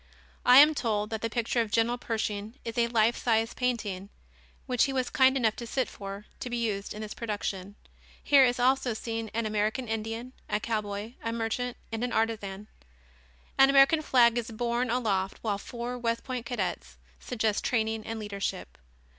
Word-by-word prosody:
I 250 +1 +8
am 300 +3 +9
told 215 -6 -1
that 220 -1 -3
the 230 - -1
picture 235 +1 0
of 225 - -2
General 235 +3 +1
Pershing 220 -1 -3
is 230 -1 -4
a 235 -1 +2
life 230 0 +3
sized 225 -1 +1
painting, 210 -6 -2 0.6
which 250 -3 +2
he 275 - -3
was 255 -2 -1
kind 265 0 +4
enough 225 -4 +2
to 235 - -6
sit 260 +2 0
for, 200 +1 -8
to 250 - -5
be 240 - -2
used 210 -4 -2
in 215 - -5
this 210 - -6
production. 205 -3 -4 0.5
Here 280 -2 +6
is 245 -1 +2
also 255 -1 +2
seen 225 0 -4
an 230 0 0
American 215 +4 -1
Indian, 225 +3 -4 0.2
a 210 - +1
cowboy, 215 0 -3
a 230 - -1
merchant 235 +2 -2
and 225 +1 -3
an 245 - -2
artisan. 210 -3 -1 0.9
An 270 0 +8
American 275 +3 +6
flag 240 -5 +4
is 235 +1 -5
borne 235 +2 -1
aloft 205 -6 0
while 205 -3 -1
four 240 +3 -5
West 230 -1 -1
Point 255 -3 -4
cadets 175 - -3 0.2
suggest 220 -3 -1
training 220 -2 0
and 225 +1 -5
leadership. 205 -2 -4
230 Hz, 180 wpm, -28 LUFS, 215-245 Hz, 0.9 s, am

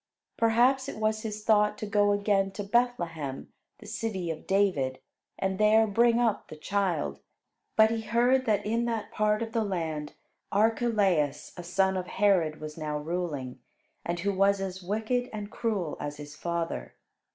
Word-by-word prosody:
Perhaps 250 +4 +3
it - - -7
was 215 0 0
his 215 -1 -5
thought 210 -1 +3
to - - -4
go 205 0 +3
again 200 -1 +2
to 205 - -4
Bethlehem, 175 - -1 0.2
the 215 - -14
city 205 -5 -3
of 160 - -8
David, 180 -10 +1 0.4
and 190 0 -2
there 215 +1 +5
bring 235 +3 +3
up 230 -3 +1
the - - -9
child. 180 -1 -1 0.6
But 220 0 +6
he 225 -1 -1
heard 245 +4 +2
that 210 -2 +1
in 230 +3 0
that 230 -2 -3
part 215 +1 +1
of 225 - -6
the 225 -1 +1
land 160 -6 -3 0.4
Archelaus, 200 - +1
a 175 - -7
son 190 +2 +1
of 180 -1 -4
Herod, 180 -7 +2
was 155 +1 -7
now 150 -1 -2
ruling, 150 -5 -4 0.4
and 170 0 -2
who 200 +1 0
was 195 +1 +3
as 190 -1 -4
wicked 220 +6 -1
and 210 -1 -6
cruel 205 -10 -2
as 145 0 -5
his 145 0 -9
father. 165 - -3
200 Hz, 165 wpm, -28 LUFS, 170-220 Hz, 0.6 s, But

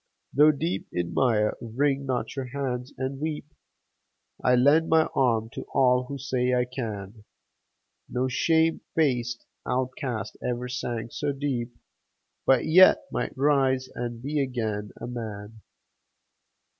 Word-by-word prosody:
Though 150 +2 +7
deep 95 - -1
in 85 -1 -2
mire, 110 -5 +2
wring 135 +4 0
not 130 0 -2
your 135 -2 -3
hands 125 -1 -3
and 135 +1 -3
weep; 155 -1 -3 1.0
I 125 - +5
lend 145 +6 +4
my 160 0 +5
arm 115 -4 +1
to - - -6
all 125 -2 +4
who 140 +2 -6
say 125 -2 0
"I 125 0 +2
can!" 110 -4 -6 0.9
No 125 +1 0
shame 160 +5 +2
faced 125 -6 0 0.2
outcast 130 -2 -3
ever 125 0 -2
sank 120 -2 -4
so 145 -1 -1
deep, 130 -4 -3 0.7
But 130 -2 +4
yet 180 +4 +7
might - - -3
rise 135 -2 +2
and 120 -1 -5
be 145 +2 -1
again 110 -6 -2
a - - -5
man 110 -3 -7
125 Hz, 130 wpm, -26 LUFS, 120-140 Hz, 1.0 s, Though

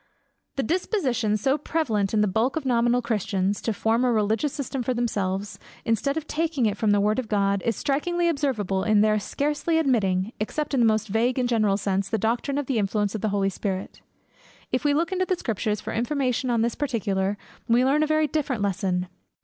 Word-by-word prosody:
The 270 - 0
disposition 255 - 0
so 270 +7 +1
prevalent 230 -11 0
in 215 - +2
the 210 - +3
bulk 220 +7 +1
of 320 - -3
nominal 240 0 +2
Christians, 205 -3 -1
to 225 - -1
form 225 +3 +1
a 250 - +3
religious 220 +5 +1
system 270 -2 -4
for 250 +1 -1
themselves, 205 -4 -2 0.3
instead 255 +6 0
of 320 - -3
taking 310 -5 0
it 210 -2 +1
from 215 +1 0
the 205 0 +4
word 210 +3 +2
of 250 - -4
God, 200 -2 +1
is 230 - +2
strikingly 345 +5 0
observable 255 - 0
in 215 -1 +4
their 215 0 +3
scarcely 295 +8 -1
admitting, 215 -8 +1
except 295 +8 -3
in 270 - +2
the 235 - +5
most 215 0 +1
vague 230 +5 +1
and 250 -1 +1
general 215 -4 +2
sense, 195 -1 -1
the 220 - 0
doctrine 235 +6 -1
of 290 - -1
the 255 -3 0
influence 205 0 0
of 215 - -4
the 215 - 0
Holy 195 -1 +1
Spirit. 190 0 -4 0.7
If 255 - 0
we 290 -1 +3
look 330 +3 0
into 370 0 0
the 370 - +1
Scriptures 215 - -2
for - - -5
information 255 +1 0
on 230 -2 +2
this 235 0 0
particular, 205 -7 -1 0.3
we 240 +2 +4
learn 285 +3 +3
a 310 - +2
very 310 0 +2
different 275 -7 -1
lesson. 185 -2 -1
230 Hz, 205 wpm, -25 LUFS, 205-275 Hz, 0.7 s, the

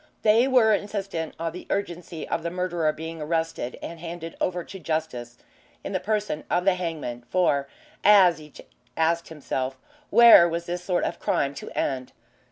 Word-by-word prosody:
They 225 +4 +5
were 245 -5 +5
insistent 195 -6 -3
on 165 0 -3
the 180 - -10
urgency 175 -4 -4
of - - -1
the 170 - -3
murderer 175 -3 0
being 160 +1 -7
arrested 160 -5 -2
and 170 0 -7
handed 165 0 -7
over 180 -1 -1
to 190 - -10
Justice 125 -8 -4 0.5
in - - -5
the 190 - 0
person 210 -7 -2
of 175 +1 +1
the 195 - +5
hangman, 160 -9 -4
for 140 -4 +2 0.4
as 185 -6 +6
each 150 -1 -13 0.4
asked 165 +1 +1
himself 135 -4 -4 0.3
where 230 -7 +8
was 170 +1 -3
this 175 +1 -4
sort 180 -1 0
of - - -3
crime 140 0 0
to - - -8
end? 130 -2 -2
170 Hz, 170 wpm, -25 LUFS, 155-185 Hz, 0.5 s, where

